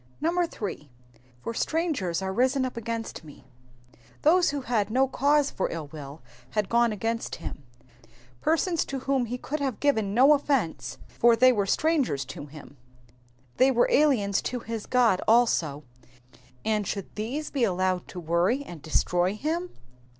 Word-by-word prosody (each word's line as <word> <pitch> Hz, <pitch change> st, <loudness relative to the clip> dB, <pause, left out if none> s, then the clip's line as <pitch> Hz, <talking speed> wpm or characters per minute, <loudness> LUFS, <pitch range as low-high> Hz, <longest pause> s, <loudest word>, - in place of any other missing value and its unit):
8. -, -, -4 dB, 1.2 s
^^For 230 Hz, -, -3 dB
strangers 275 Hz, -, -1 dB
are 190 Hz, 0 st, -2 dB
risen 260 Hz, +4 st, +2 dB
up 255 Hz, -, -5 dB
against 230 Hz, -4 st, -5 dB
me,'''' 150 Hz, -2 st, -14 dB, 0.8 s
Those 345 Hz, +4 st, +5 dB
who 285 Hz, -1 st, -3 dB
had 225 Hz, -5 st, 0 dB
no 260 Hz, +4 st, +3 dB
cause 285 Hz, +2 st, +2 dB
for -, -, -2 dB
ill 160 Hz, -3 st, -6 dB
will 145 Hz, -1 st, -9 dB, 0.3 s
had 210 Hz, -3 st, -1 dB
gone 235 Hz, 0 st, +3 dB
against 225 Hz, +2 st, -3 dB
him; -, -, -8 dB, 0.8 s
persons 330 Hz, +1 st, +1 dB
to 270 Hz, -1 st, -5 dB
whom 270 Hz, -2 st, +1 dB
he 245 Hz, +2 st, -4 dB
could 300 Hz, +4 st, -4 dB
have 270 Hz, -6 st, -2 dB
given 220 Hz, -9 st, +1 dB
no 270 Hz, +5 st, +7 dB
offence, 275 Hz, -, -1 dB
for 235 Hz, 0 st, +3 dB
they 255 Hz, +3 st, +6 dB
were 205 Hz, -5 st, 0 dB
strangers 275 Hz, -, +1 dB
to 145 Hz, +2 st, -8 dB
him. 145 Hz, -1 st, -13 dB, 0.8 s
They 260 Hz, +1 st, +5 dB
were 245 Hz, -2 st, +3 dB
aliens 235 Hz, -10 st, +3 dB
to 250 Hz, -1 st, -4 dB
his 225 Hz, -2 st, -6 dB
God 235 Hz, -7 st, +3 dB
also, 175 Hz, -11 st, +3 dB, 0.8 s
and 215 Hz, -3 st, 0 dB
should 200 Hz, -2 st, -5 dB
these 255 Hz, +9 st, -4 dB
be 270 Hz, -4 st, 0 dB
allowed 185 Hz, -3 st, 0 dB
to 180 Hz, -, -8 dB
worry 175 Hz, -, +1 dB
and 175 Hz, -, -10 dB
destroy 175 Hz, +5 st, +1 dB
him. 330 Hz, +9 st, -2 dB
230 Hz, 155 wpm, -27 LUFS, 190-275 Hz, 1.2 s, no